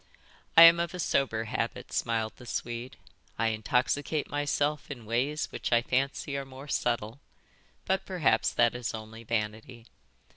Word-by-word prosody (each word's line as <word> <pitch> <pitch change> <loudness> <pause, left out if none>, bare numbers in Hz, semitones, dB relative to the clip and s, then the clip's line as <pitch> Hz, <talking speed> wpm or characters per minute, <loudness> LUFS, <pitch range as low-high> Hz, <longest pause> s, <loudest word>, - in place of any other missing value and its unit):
"I 165 - +12
am 165 0 +9
of 170 +1 -2
a - - -6
sober 130 -8 +1
habit," 110 - -4
smiled 110 -1 -1
the 125 - -13
Swede. 120 +2 -4 0.4
"I 115 0 +2
intoxicate 125 +7 0
myself 145 0 -1
in 125 -6 -8
ways 130 +7 -1
which - - -4
I 120 0 +4
fancy 135 +2 -1
are 140 - -3
more 135 +1 -11
subtle. 120 -3 -1 0.7
But 190 0 0
perhaps 180 -6 +2
that 120 -1 +3
is 120 -2 -4
only 110 +1 -9
vanity. 115 +1 -3
125 Hz, 150 wpm, -29 LUFS, 115-145 Hz, 0.7 s, I